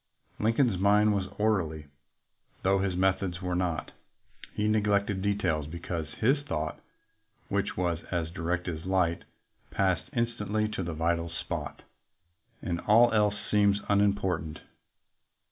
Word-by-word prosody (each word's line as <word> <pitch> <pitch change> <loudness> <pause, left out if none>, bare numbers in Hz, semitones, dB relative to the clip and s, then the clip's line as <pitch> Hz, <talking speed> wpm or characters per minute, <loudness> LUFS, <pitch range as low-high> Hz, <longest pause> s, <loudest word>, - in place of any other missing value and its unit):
Lincoln's 115 -2 +2
mind 105 +2 +4
was 95 -2 -1
orderly, 90 -8 0 0.8
though 95 +1 +3
his 95 -2 0
methods 95 -1 +1
were 90 -1 -3
not. 90 -2 -1 0.6
He 105 - 0
neglected 105 -2 +1
details 95 -7 0
because 85 -1 -4
his 135 +6 +3
thought, 80 - -3 0.7
which - - -1
was 85 -2 0
"as 85 -2 -2
direct 90 0 -2
as 80 0 -4
light," 90 -3 +1 0.4
passed 95 +2 0
instantly 110 -3 0
to 105 -2 -3
the 85 -2 -4
vital 85 +1 0
spot, 85 - -5 0.8
and 85 -1 -2
all 115 +3 +6
else 105 -2 +3 0.2
seemed 100 -1 +4
unimportant. 100 -6 +1
95 Hz, 125 wpm, -29 LUFS, 85-105 Hz, 0.8 s, all